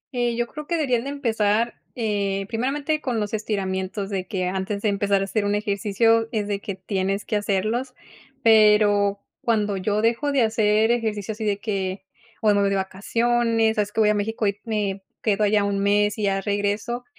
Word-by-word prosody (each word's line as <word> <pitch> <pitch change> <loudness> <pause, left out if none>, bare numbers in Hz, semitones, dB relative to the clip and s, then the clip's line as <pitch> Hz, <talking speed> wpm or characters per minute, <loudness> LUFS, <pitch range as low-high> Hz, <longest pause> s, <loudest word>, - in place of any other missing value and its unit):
Eh, 240 -1 0
yo 240 0 0
creo 300 +5 -9
que 340 - 0
deberían 255 -6 0
de - - -3
empezar, 230 -4 0 0.2
eh, 200 -4 -1
primeramente 280 +7 -1
con 245 -5 -1
los 210 0 -3
estiramientos 195 -1 -2
de 185 -2 -3
que 185 -3 -2
antes 190 +2 -3
de 215 - +2
empezar 200 -1 +1
a - - +1
hacer 205 +2 -1
un 205 0 +1
ejercicio 215 +2 +1
es 210 -3 -1
de 200 -1 -2
que 200 - -5
tienes 195 +1 -2
que - - -2
hacerlos. 215 +5 -1 0.5
Pero 210 -2 +5 0.2
cuando 210 -3 +1
yo 205 +2 0
dejo 235 +6 +1
de 270 -4 +3
hacer 220 0 +2
ejercicio 220 -3 -1
así 220 +1 -6
de 205 -1 +1
que 195 -3 -3 0.4
o 215 -1 +4
me 205 - +2
voy 200 - +2
de 200 - 0
vacaciones. 225 +4 +1
Sabes 210 -1 0
que 225 - +1
voy 210 - +4
a - - +4
México 215 +2 -1
y 200 0 0
me 205 -3 -2 0.2
quedo 210 -1 +2
allá 205 0 +3
un 200 -1 -1
mes 205 +1 +2
y 210 - -2
ya 195 -1 +1
regreso. 205 +5 -2
210 Hz, 195 wpm, -23 LUFS, 200-230 Hz, 0.5 s, Pero